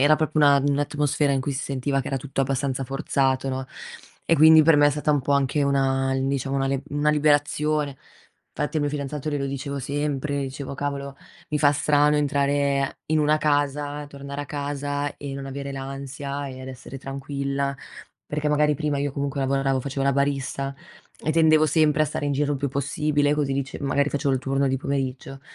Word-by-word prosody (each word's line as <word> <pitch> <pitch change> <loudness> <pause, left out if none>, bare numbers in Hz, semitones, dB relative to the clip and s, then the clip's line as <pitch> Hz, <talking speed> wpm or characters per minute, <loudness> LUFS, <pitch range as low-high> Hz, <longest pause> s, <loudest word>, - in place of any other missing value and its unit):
era 150 +2 +5
proprio 155 -1 +1
una 140 0 +6
un'atmosfera 145 0 +1
in 135 - +1
cui 140 +2 -2
si 135 - -3
sentiva 135 +1 -1
che 135 - -5
era 135 - -1
tutto 135 +1 -3
abbastanza 135 0 -1
forzato, 135 0 0
no, 130 0 -3 0.6
e 165 - +4
quindi 160 +1 +8
per 160 -1 +5
me 145 0 +6
è - - +4
stata 150 +1 0
un 145 - +2
po' 140 - 0
anche 140 +1 +2
una, 135 -1 +1
diciamo, 135 0 -1
una 135 0 +1
lib 135 0 -1
una 145 +1 +2
liberazione. 150 -1 +1 0.6
Infatti 150 +2 -2
al 150 - +1
mio 145 - 0
fidanzato 145 +1 -4
glielo 140 -1 -1
dicevo 140 +1 -4
sempre, 145 +1 -2
dicevo: 135 +1 -5
"Cavolo, 140 -1 -4 0.3
mi 150 - 0
fa 145 0 +5
strano 150 +1 +3
entrare 140 -1 +1
in 155 0 +1
una 150 +1 +3
casa, 145 0 0
tornare 140 0 -6
a - - -9
casa 145 0 -3
e 140 -1 -6
non 135 0 -6
avere 140 +1 -5
l'ansia 140 +1 -5
e 130 0 -9
ad 130 - -7
essere 130 +1 -9
tranquilla", 140 0 -3 0.5
perché 150 0 -2
magari 150 0 +3
prima 145 -1 -1
io 145 0 -1
comunque 140 0 -2
lavoravo, 135 0 +1
facevo 135 +1 -3
la 140 - +3
barista 140 0 -1 0.5
e 155 - +1
tendevo 155 -1 +5
sempre 155 -1 +3
a - - +2
stare 145 - -3
in 145 - 0
giro 145 +1 0
il 140 - -2
più 140 - -1
possibile, 145 +2 0
così, 145 -2 0
dici, 135 -1 -3
magari 140 +1 +1
facevo 140 -1 0
il 130 - -1
turno 135 +1 0
di 135 - +1
pomeriggio 135 0 -3
140 Hz, 195 wpm, -24 LUFS, 135-145 Hz, 0.6 s, quindi